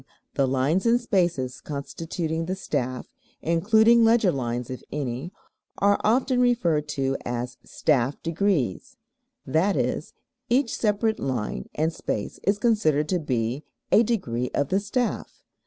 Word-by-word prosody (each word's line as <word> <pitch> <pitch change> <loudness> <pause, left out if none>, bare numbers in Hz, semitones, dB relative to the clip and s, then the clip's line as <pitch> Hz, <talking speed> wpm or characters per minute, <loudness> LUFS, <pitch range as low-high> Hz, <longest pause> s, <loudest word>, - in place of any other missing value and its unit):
The 135 - +2
lines 135 - +1
and 235 +1 +4
spaces 170 - 0
constituting 160 +3 -4
the 185 - -1
staff 130 -9 -3 0.4
(including 220 +8 +4
leger 225 -4 +4
lines 125 -3 -3
if 130 - -6
any) 135 +3 -3 0.5
are 200 0 +3
often 250 +3 +2
referred 175 -12 +2
to 135 0 0
as 120 +1 -4
staff 135 -3 0
degrees, 195 - -1 0.5
i.e., 185 +5 +1 0.5
each 245 0 +2
separate 220 0 +1
line 110 - -3
and 160 +2 0
space 105 - -4
is 200 +1 +1
considered 180 -10 +2
to 180 - +1
be 125 -1 -2 0.3
"a - - +7
degree 125 - -1
of 145 - 0
the 190 - +2
staff." 225 +4 -3
165 Hz, 130 wpm, -25 LUFS, 135-215 Hz, 0.5 s, a